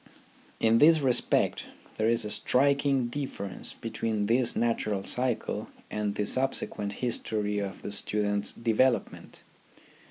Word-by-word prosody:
In 115 0 +4
this 160 +1 +6
respect 130 -4 +1 0.3
there 110 +1 +2
is 115 -1 +1
a 105 - -4
striking 140 0 +2
difference 120 -7 -5
between 110 -2 -3
this 120 +3 +2
natural 110 -4 0
cycle 125 +1 -1 0.2
and 105 -1 -2
the 105 - -1
subsequent 105 -4 0
history 105 -3 -1
of 100 -1 -5
the - - -5
student's 105 0 +1
development. 120 +2 0
115 Hz, 120 wpm, -28 LUFS, 105-130 Hz, 0.3 s, this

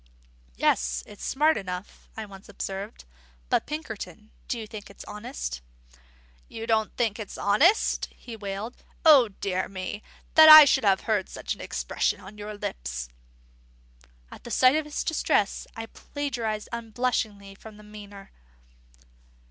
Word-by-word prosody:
"Yes, 60 0 +1
it's 205 - -12
smart 305 +3 +2
enough," 185 -1 -7
I 220 - -4
once 195 -1 -14
observed. 195 +3 -6 0.4
"But, - - +1
Pinkerton, 220 - -7 0.2
do 245 - -2
you 225 - -5
think 215 -1 -10
it's 200 - -12
honest?" 210 - -6 0.9
"You 225 - -7
don't 220 -1 0
think 230 -3 0
it's 210 - -7
honest!" 305 - +3
he 235 - -10
wailed. 205 +2 -6 0.3
"O 285 -7 +8
dear 195 -2 -3
me, 190 +2 -5 0.3
that 315 0 +9
ever 310 - +14
I 305 - +11
should 265 -3 +2
have 195 -1 +4
heard 210 -4 -1
such - - -4
an - - -11
expression - - -1
on 205 +3 -12
your 210 0 -6
lips!" - - -5 1.2
At 240 - -10
sight 255 +5 +5
of 310 -1 0
his 300 - -3
distress, 210 -10 0
I 225 - -5
plagiarised 235 -5 -4
unblushingly 225 -4 -2
from 210 +2 -13
Myner. 205 -2 -12
215 Hz, 140 wpm, -26 LUFS, 195-240 Hz, 1.2 s, ever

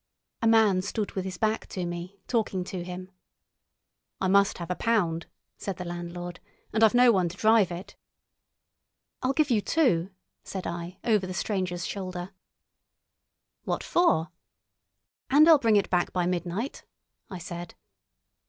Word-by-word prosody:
A 230 - +2
man 220 -5 +5
stood 205 +2 -3
with 190 -1 -3
his 185 -2 -5
back 220 +2 0
to 180 -2 -4
me, 175 +3 -6
talking 210 -6 0
to 180 -1 -5
him. 180 +1 -7 1.1
"I 190 - 0
must 200 +1 +4
have 170 0 -5
a - - 0
pound," 175 -8 0 0.3
said 195 -3 -4
the 180 - -5
landlord, 175 0 -6 0.3
"and 225 0 +3
I've 220 +1 +5
no 245 0 +7
one 185 -5 +2
to 180 - -10
drive 215 -4 +4
it." 175 +3 -7 1.3
"I'll 255 - +1
give 295 -2 +2
you 220 -3 +3
two," 195 - +2 0.3
said 190 -2 -6
I, 170 +1 -5
over 210 -5 +2
the 185 - -5
stranger's 180 -2 -2
shoulder. 185 -2 -5 1.3
"What - - -2
for?" 170 - +2 1.0
"And 295 +3 +6
I'll 320 -3 +8
bring 225 -4 +3
it 200 - +2
back 180 -1 +1
by 180 -1 0
midnight," 180 +7 -3 0.5
I 185 - -6
said. 175 0 -7
185 Hz, 155 wpm, -27 LUFS, 175-220 Hz, 1.3 s, I'll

